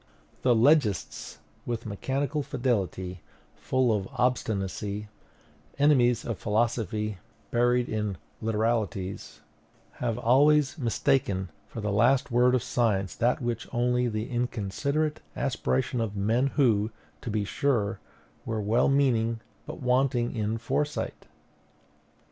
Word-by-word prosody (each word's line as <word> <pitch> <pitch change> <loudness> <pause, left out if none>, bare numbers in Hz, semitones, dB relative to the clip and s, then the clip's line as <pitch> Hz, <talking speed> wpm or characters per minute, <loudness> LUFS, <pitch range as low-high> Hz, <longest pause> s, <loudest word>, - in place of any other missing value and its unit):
The 125 -2 +4
legists 115 - +2 0.3
with 120 -1 -4
mechanical 135 +8 -2
fidelity, 100 - -2 0.3
full 130 -4 +1
of 95 -2 -3
obstinacy, 105 -4 -1 0.7
enemies 130 -5 +4
of 115 -5 -3
philosophy, 110 -2 -1 0.3
buried 120 +1 +2
in 105 -3 -2 0.2
literalities 110 -3 -2 0.6
have 120 -2 0
always 140 +4 +4
mistaken 105 - 0 0.2
for 115 - -7
the 105 -1 -1
last 120 +6 +3
word 125 +1 +4
of 125 - 0
science 100 -6 0
that 125 +2 +1
which 120 -1 -2
was - - -22
only 125 +1 +2
the 110 -1 -2
inconsiderate 125 +6 -1
aspiration 130 -1 0
of 105 -3 -2
men 115 +7 +2
who, 110 -6 +3 0.3
to - - -5
be 105 -1 0
sure, 105 -1 0 0.4
were 110 -1 -2
well 110 +5 +2
meaning, 115 -5 +2 0.3
but - - -7
wanting 125 -1 +1
in 110 0 -1
foresight. 145 +6 -2
120 Hz, 115 wpm, -27 LUFS, 105-125 Hz, 0.7 s, The